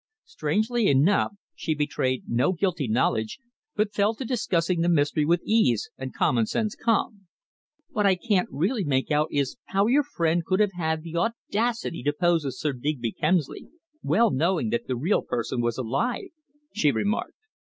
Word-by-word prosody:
Strangely 240 - 0
enough, 155 +10 +3 0.2
she 155 - -2
betrayed 145 -3 -1
no 125 +11 +1
guilty 175 -6 -1
knowledge, 110 -1 0 0.4
but 210 -1 0
fell 210 +2 +2
to 260 - -6
discussing 180 -8 0
the 170 - +2
mystery 150 -2 +2
with 170 +2 +2
ease 170 - +2
and 130 0 -6
common 115 -3 +1
sense 215 -2 -1
calm. 210 -3 -1 0.6
"What 210 -2 +1
I 190 - +4
can't 190 -1 0
really 195 - 0
make 135 -2 0
out 150 +1 +2
is 140 - -1
how 195 +1 +1
your 265 +6 +4
friend 170 - 0
could 185 +3 0
have 210 -2 +3
had 160 -2 -2
the 170 0 -5
audacity 230 - -1
to 145 +4 0
pose 165 -1 +1
as 130 -1 -5
Sir 150 -2 -1
Digby 125 -3 -2
Kemsley, 155 +1 -1 0.3
well 230 -2 +3
knowing 185 - +1
that 235 0 -2
the 130 - -1
real 155 - +1
person 120 +1 -2
was 120 -1 -1
alive," 225 - -2 0.4
she 160 -9 +2
remarked. 210 - -2
170 Hz, 170 wpm, -25 LUFS, 145-210 Hz, 0.6 s, I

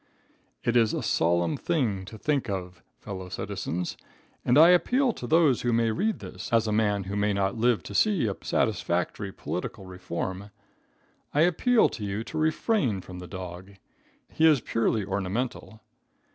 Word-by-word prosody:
It 120 - 0
is 115 -3 +3
a - - -3
solemn 85 0 +1
thing 115 - -1
to 110 +3 -10
think 140 -2 -1
of, 90 -2 -5 0.2
fellow 95 -3 -7
citizens, 90 0 -4 0.5
and 125 - +3
I 160 +3 +9
appeal 245 +8 +3
to 120 - -7
those 155 -5 +4
who 120 - 0
may 115 -1 +2
read 210 - 0
this, - - -8
as 115 -1 +3
a 110 - -1
man 105 -2 +1
who 95 +2 -5
may 105 0 +1
not 100 +1 0
live 120 0 +2
to - - -8
see 200 - +2
a 100 -3 -1
satisfactory 90 +3 -1
political 95 - -5
reform 95 +2 -5 0.9
I 150 - +4
appeal 215 +8 +4
to 110 - -7
you 100 +2 -3
to 125 +7 -7
refrain 155 - +1
from 90 0 -10
the 90 - -8
dog. 95 +1 -8 0.5
He 160 - +3
is 150 -4 +5
purely 115 -2 0
ornamental. 100 +4 -3
110 Hz, 165 wpm, -27 LUFS, 95-140 Hz, 0.9 s, I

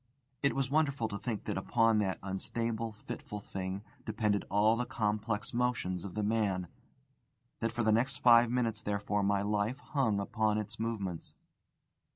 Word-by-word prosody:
It 140 - +2
was 135 -1 0
wonderful 140 -6 +2
to 100 - -4
think 115 -4 -3
that - - -2
upon 115 +2 +3
that 95 -4 0
unstable, 115 +4 -2
fitful 105 0 -7
thing 95 0 -5 0.2
depended 105 -2 0
all 105 +3 +4
the 125 - 0
complex 105 0 -1
motions 120 -7 0
of 100 -3 -7
the 105 - 0
man; 100 -4 +1 0.9
that 115 0 0
for 120 0 -1
the 110 - +4
next 125 +4 +2
five 120 -1 +6
minutes, 115 -3 0
therefore, 105 -1 -1
my 100 0 +2
life 105 +4 0
hung 135 -8 0
upon 105 +1 +1
its 105 +2 -4
movements. 100 -7 -3
110 Hz, 160 wpm, -32 LUFS, 100-115 Hz, 0.9 s, five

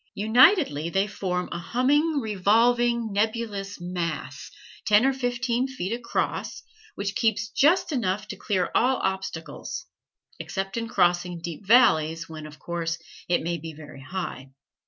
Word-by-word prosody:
Unitedly 220 - +4
they 195 +3 +1
form 180 -3 -3
a - - -3
humming, 285 - +2
revolving, 230 +2 +2
nebulous 205 -2 -2
mass, 175 -2 -4 0.4
ten 210 +3 +5
or 270 - +3
fifteen 245 -1 -1
feet 230 -6 -4
across, 235 0 -3 0.3
which 200 0 -3
keeps 220 +1 0
just 320 +9 +3
high 285 - 0
enough 210 -2 -1
to 210 - -6
clear 185 -4 -1
all 255 +2 +3
obstacles, 190 - -4 0.5
except 195 0 -4
in 230 -1 -2
crossing 175 -4 +1
deep 170 +3 -7
valleys, 165 -9 +4
when, 155 -1 -8
of 150 0 -13
course, 165 -1 -3 0.3
it 175 - +2
may 170 0 -2
be 160 +1 -7
very 145 -2 -12
high. 140 -4 -6
200 Hz, 140 wpm, -25 LUFS, 175-240 Hz, 0.5 s, ten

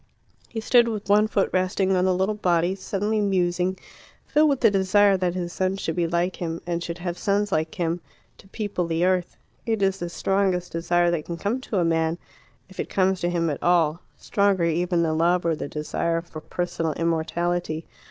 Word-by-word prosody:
He 225 - -4
stood 240 +1 +4
with 215 -3 -4
one 210 +1 +5
foot 200 -3 0
resting 185 +1 +1
on 180 0 +2
the 185 -1 +2
little 190 +3 +1
body, 175 -3 +1
suddenly 205 +2 -1
musing, 185 -1 +1 0.5
filled 305 +1 +3
with 275 -2 0
the 225 - +5
desire 195 +1 +4
that 180 -1 -1
his 175 -1 -3
son 190 +1 0
should 165 -4 -3
be 175 -1 +1
like 170 +2 -1
him, 165 -1 -3
and 170 -1 -2
should 170 0 -5
have 175 0 -4
sons 205 +1 0
like 160 -2 -1
him, 170 0 -1 0.4
to - - -16
people 200 -4 -3
the 165 +1 +1
earth. 185 -1 0 0.3
It 220 -3 -1
is 195 0 +1
the 175 - -4
strongest 190 0 0
desire 175 +1 +1
that 165 -3 -2
can 170 - -5
come 220 +8 -2
to 220 - -3
a 175 - +2
man 165 0 +1 0.5
if 190 - -16
it - - -3
comes 190 -1 +1
to 175 - 0
him 170 -1 0
at 145 - -5
all 170 -1 +2 0.2
stronger 200 -3 +1
even 170 +1 +1
than 160 -1 0
love 175 +1 +2
or 165 -1 +2
the 150 - -5
desire 165 +3 -2
for 160 -2 -10
personal 165 -2 -2
immortality. 165 0 -1
180 Hz, 200 wpm, -24 LUFS, 170-195 Hz, 0.5 s, one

